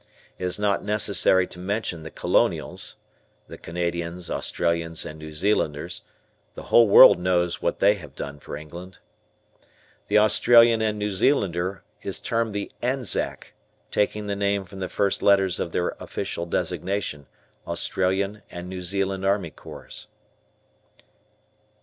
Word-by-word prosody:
It 90 - -3
is 90 - 0
not 105 -1 0
necessary 100 -3 +2
to 90 - -10
mention 95 -2 -3
the 80 - -8
Colonials - - 0 0.5
(the - - -11
Canadians, 85 0 -4
Australians, 85 -1 -1
and 75 0 -8
New 80 0 -8
Zealanders), 80 -1 -1 0.5
the - - -8
whole 115 -1 +8
world 100 - +9
knows 90 -1 0
what - - 0
they 100 +1 +5
have 100 -5 -11
done 70 0 -6
for - - -8
England. 85 +4 -10 1.1
The 105 - +3
Australian 115 +2 +6
and 110 -1 0
New 105 0 -2
Zealander 95 - 0 0.2
is - - -4
termed 115 -2 -1
the 100 - -3
"Anzac," 125 -2 -2 0.4
taking 105 0 0
the 100 -1 -2
name 100 -1 0
from 95 +1 -11
the 95 - -3
first 100 -1 0
letters 95 -3 +3
of 85 - -3
their 90 - 0
official 85 - -4
designation, 90 -6 -2 0.4
Australian 95 +4 -1
and 90 +1 -8
New 95 0 -6
Zealand 95 +1 -2
Army 95 -4 0
Corps. - - -8
95 Hz, 135 wpm, -24 LUFS, 85-105 Hz, 1.1 s, world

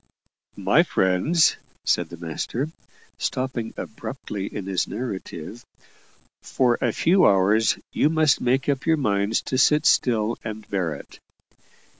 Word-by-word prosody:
"My - - +4
friends," 95 - +2 0.3
said - - +1
the 85 - -9
master, 100 - -4 0.5
stopping 130 -3 -3
abruptly 105 -4 -6
in 100 - -6
his 95 -2 -1
narrative, 105 -2 -6 0.8
"for 125 -2 +1
a 120 - +2
few 180 - +4
hours 100 +3 +3 0.2
you 150 - +3
must 155 -3 +2
make 130 +2 +1
up 140 0 -1
your 160 -1 +4
minds 100 -4 0
to 130 - -1
sit 150 +3 +4
still 115 -6 +2
and 110 -1 -7
bear 90 -6 -2
it. - - -13
115 Hz, 130 wpm, -23 LUFS, 100-135 Hz, 0.8 s, My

